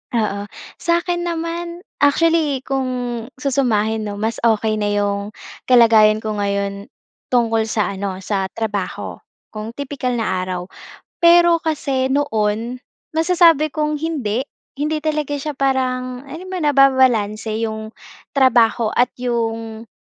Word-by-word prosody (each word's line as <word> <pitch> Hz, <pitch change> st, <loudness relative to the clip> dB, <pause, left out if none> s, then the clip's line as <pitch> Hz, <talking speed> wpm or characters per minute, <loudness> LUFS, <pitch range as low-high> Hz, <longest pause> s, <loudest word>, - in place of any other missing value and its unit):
Oo. 205 Hz, -2 st, -1 dB, 0.3 s
Sa'kin 345 Hz, +1 st, 0 dB
naman 340 Hz, +1 st, -4 dB, 0.2 s
actually 295 Hz, -2 st, +2 dB
kung 270 Hz, -1 st, -1 dB, 0.5 s
susumahin, 225 Hz, -6 st, 0 dB
'no, 205 Hz, -, -4 dB
mas 220 Hz, +3 st, -2 dB
okay 220 Hz, -1 st, +1 dB
na 205 Hz, -, 0 dB
'yong 205 Hz, 0 st, -1 dB, 0.3 s
kalagayan 220 Hz, -3 st, +5 dB
ko 215 Hz, -, -2 dB
ngayon, 200 Hz, 0 st, -2 dB, 0.4 s
tungkol 225 Hz, -3 st, +1 dB
sa 215 Hz, -2 st, 0 dB
ano 195 Hz, -1 st, -4 dB
sa 195 Hz, -2 st, -1 dB
trabaho, 205 Hz, -1 st, -4 dB, 0.3 s
kung 220 Hz, +2 st, -7 dB
tipikal 275 Hz, -3 st, -3 dB
na 190 Hz, -5 st, -1 dB
araw. 185 Hz, -1 st, -3 dB, 0.6 s
Pero 340 Hz, -1 st, +6 dB
kasi 275 Hz, -5 st, -1 dB
noon, 235 Hz, -3 st, -1 dB, 0.3 s
masasabi 330 Hz, -3 st, +4 dB
kong 300 Hz, -1 st, -1 dB
hindi. 275 Hz, -7 st, -2 dB, 0.3 s
Hindi 300 Hz, +2 st, -1 dB
talaga 300 Hz, -2 st, -1 dB
siya 295 Hz, 0 st, -4 dB
parang 255 Hz, -1 st, -1 dB
alam 325 Hz, +6 st, -8 dB
mo 375 Hz, -, -3 dB
nababalanse 255 Hz, -7 st, +3 dB
'yong, 220 Hz, 0 st, -5 dB, 0.4 s
trabaho 235 Hz, -4 st, +3 dB
at 245 Hz, -, +3 dB
'yong, 225 Hz, -2 st, -3 dB
245 Hz, 120 wpm, -19 LUFS, 215-290 Hz, 0.6 s, Pero